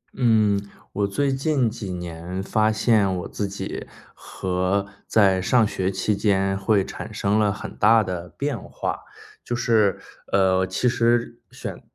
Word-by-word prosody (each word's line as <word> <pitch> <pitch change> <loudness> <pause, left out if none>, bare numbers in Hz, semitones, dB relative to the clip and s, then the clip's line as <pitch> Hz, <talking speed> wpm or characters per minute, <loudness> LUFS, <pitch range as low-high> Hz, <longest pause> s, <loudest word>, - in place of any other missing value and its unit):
嗯， 110 -5 +3 0.3
我 100 0 0
最 135 +7 0
近 135 -2 +1
几 105 -3 -5
年 90 +1 -5
发 110 +2 +2
现 110 -3 +2
我 90 - -5
自 100 - -3
己 100 +1 -6 0.3
和 95 +2 -2 0.2
在 95 -4 +4
上 115 +4 +3
学 95 -2 -1
期 105 +2 0
间， 95 -1 +1
会 100 0 +2
产 110 - -7
生 105 0 +1
了 105 -1 +3
很 100 - -7
大 110 +2 +5
的 90 -2 -5
变 140 -3 -2
化， - - -4 0.4
就 120 - -3
是， 110 -4 +2 0.3
呃， 95 -1 +3
其 95 +7 0
实 120 0 +1
选 - - -7
100 Hz, 160 characters per minute, -23 LUFS, 95-115 Hz, 0.4 s, 大